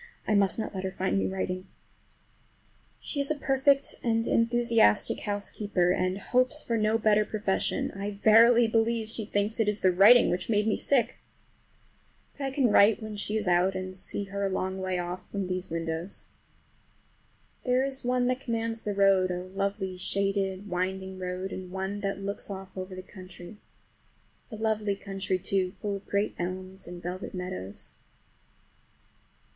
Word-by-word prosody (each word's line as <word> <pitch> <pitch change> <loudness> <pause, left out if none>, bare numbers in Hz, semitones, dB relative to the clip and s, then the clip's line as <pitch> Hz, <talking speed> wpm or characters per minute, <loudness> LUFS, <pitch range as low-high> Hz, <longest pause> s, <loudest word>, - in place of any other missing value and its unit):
I - - +2
must 200 -2 +3
not 220 - -3
let 190 -1 -4
her 190 - -1
find 190 +1 -1
me - - 0
writing. 185 -1 -3 1.3
She 290 - -5
is 280 - 0
a 310 - +1
perfect, 275 0 +2
and 225 -1 +1
enthusiastic 230 - +3
housekeeper, 205 -3 0
and 185 +1 0
hopes 255 +7 +1
for 230 - -1
no 215 0 +2
better 215 -1 +3
profession. 210 -2 -1
I 200 +1 -4
verily 225 +4 +6
believe 225 0 +1
she 220 -1 -3
thinks 205 +2 -1
it 220 -2 +3
is 210 0 -1
the 185 - +5
writing 205 +7 +7
which 180 +3 -2
made 210 -1 +2
me 215 - +2
sick! 255 -3 +1 1.2
But 280 - -4
I - - 0
can 265 -4 +2
write 210 +2 +5
when 215 -1 -6
she 210 +1 -2
is 210 -3 -3
out, 180 +2 +3
and 185 0 -5
see 190 +2 -2
her 200 0 -4
a 195 - +1
long 190 0 -2
way 185 -1 -1
off 180 +1 -5
from 200 -2 -3
these 185 0 -3
windows. 165 +2 -4 1.3
There 250 0 +2
is 270 0 -3
one 250 0 +1
that 255 +1 +1
commands 230 -2 -2
the 205 -1 -3
road, 195 -2 +4
a 180 0 -3
lovely, 195 -1 -2
shaded, 195 +1 -1
winding 190 +1 -3
road, 185 +1 -4
and 185 -1 -7
one 190 +2 -3
that 195 -1 -2
just 195 0 -8
looks 200 +1 -5
off 190 -1 -8
over 185 0 -6
the 185 - -7
country. 185 0 -11 0.9
A 225 - -7
lovely 215 -2 0
country, 195 -1 -3
too, 185 0 0
full 205 -2 -2
of 195 - -16
great 200 +1 0
elms 185 +2 -5
and 175 0 -9
velvet 180 +2 -5
meadows. 100 - -5
200 Hz, 170 wpm, -28 LUFS, 185-220 Hz, 1.3 s, writing